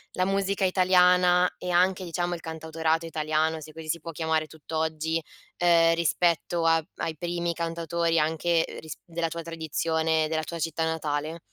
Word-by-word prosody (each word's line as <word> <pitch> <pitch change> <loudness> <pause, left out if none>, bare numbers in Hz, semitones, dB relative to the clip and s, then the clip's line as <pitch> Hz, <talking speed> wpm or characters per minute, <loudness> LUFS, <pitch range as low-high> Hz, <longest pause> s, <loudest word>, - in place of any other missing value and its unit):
la 185 - +1
musica 195 0 0
italiana, 180 -1 +4
e 180 - -4
anche 185 +2 +3
diciamo 175 0 -2
il - - -8
cantautorato 160 0 -2
italiano, 155 0 0
se 155 - -10
così 160 -1 -9
si 170 +2 -1
può 165 +2 -7
chiamare 160 0 0
tutt'oggi, 160 +1 -2 0.4
ehm, 165 -1 +4
rispetto 170 0 +1
a 165 -1 +4
ai 160 -1 -3
primi 170 0 -2
cantautori 170 0 -1
anche, 160 +2 +1
ehm, - - -9
risp 155 -1 -9
della 165 -1 -2
tua 170 +1 -5
tradizione, 160 -1 0
della 155 0 -1
tua 170 0 -6
città 165 0 -1
natale? 155 0 -2
165 Hz, 160 wpm, -27 LUFS, 160-175 Hz, 0.4 s, italiana